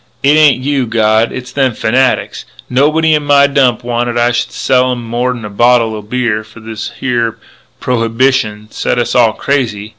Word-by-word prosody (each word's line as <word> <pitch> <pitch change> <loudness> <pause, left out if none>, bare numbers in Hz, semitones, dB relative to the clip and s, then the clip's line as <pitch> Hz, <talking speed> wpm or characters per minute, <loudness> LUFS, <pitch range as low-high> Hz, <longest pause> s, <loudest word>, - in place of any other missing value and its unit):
It 140 +2 +4
ain't 145 -5 +4
you, 140 -3 -1
God, 110 0 +1
it's 125 0 -7
them 135 -4 0
fanatics.... 130 +3 0 0.3
Nobody 155 +5 +2
in 150 - +2
my 145 -1 +4
Dump 130 -4 +1
wanted 120 0 -2
I 120 0 +2
should 120 - -2
sell 130 -1 +1
'em 120 -1 -4
more'n 120 0 -3
a - - -6
bottle 120 +1 +2
o' 105 - -6
beer 115 0 -2
before 110 +1 -14
this 110 -1 -6
here 120 -3 -1 0.4
prohybishun 115 -3 -1
set - - -1
us 120 -1 -1
all 120 -3 +3
crazy. 110 -7 -2
120 Hz, 175 wpm, -13 LUFS, 115-130 Hz, 0.4 s, It